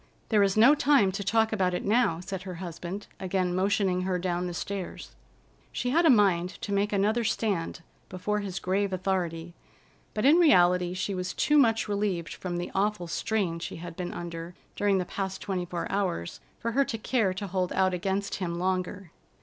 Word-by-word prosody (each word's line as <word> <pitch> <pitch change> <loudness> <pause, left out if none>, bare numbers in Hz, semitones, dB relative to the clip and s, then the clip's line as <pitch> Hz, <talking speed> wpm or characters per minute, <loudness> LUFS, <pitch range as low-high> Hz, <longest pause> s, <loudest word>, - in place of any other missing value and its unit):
"There 215 -3 +4
is 195 0 +2
no 235 +7 +8
time 280 -9 +4
to 200 +2 -4
talk 220 +2 +2
about 185 -4 +1
it - - -3
now," 205 -6 +2
said 190 0 -5
her 185 -1 -7
husband, 175 +3 -6
again 185 -1 -1
motioning 190 0 +1
her 185 0 0
down 180 0 -1
the 175 - -4
stairs. 195 -1 -5 0.6
She 250 - -2
had 335 +4 +4
a - - +6
mind 195 -7 +4
to 205 - -4
make 200 +1 +1
another 210 +4 +1
stand 200 -7 -1 0.3
before 210 +3 -2
his 195 -3 -5
grave 195 +2 0
authority, 175 -3 -2 0.6
but 215 - 0
in 300 +5 +7
reality 180 - +4
she 195 +2 -2
was 180 -1 -3
too 300 0 +3
much 225 -5 +3
relieved 200 -5 -1
from 175 -2 -4
the 175 - -4
awful 205 -1 0
strain 175 -1 -1
she - - -6
had 170 0 -8
been 180 0 -4
under 170 0 -6 0.2
during 200 -1 +2
the 180 - -1
past 190 +1 -4
twenty 185 -3 -3
four 175 -1 -4
hours 185 - -2 0.2
for 230 - -3
her 275 +4 +3
to 235 -4 -4
care 220 -3 +1
to 200 - -4
hold 185 -1 -1
out 190 -1 +2
against 195 +3 -2
him 175 -3 -3
longer. 185 0 -2
190 Hz, 190 wpm, -28 LUFS, 180-210 Hz, 0.6 s, no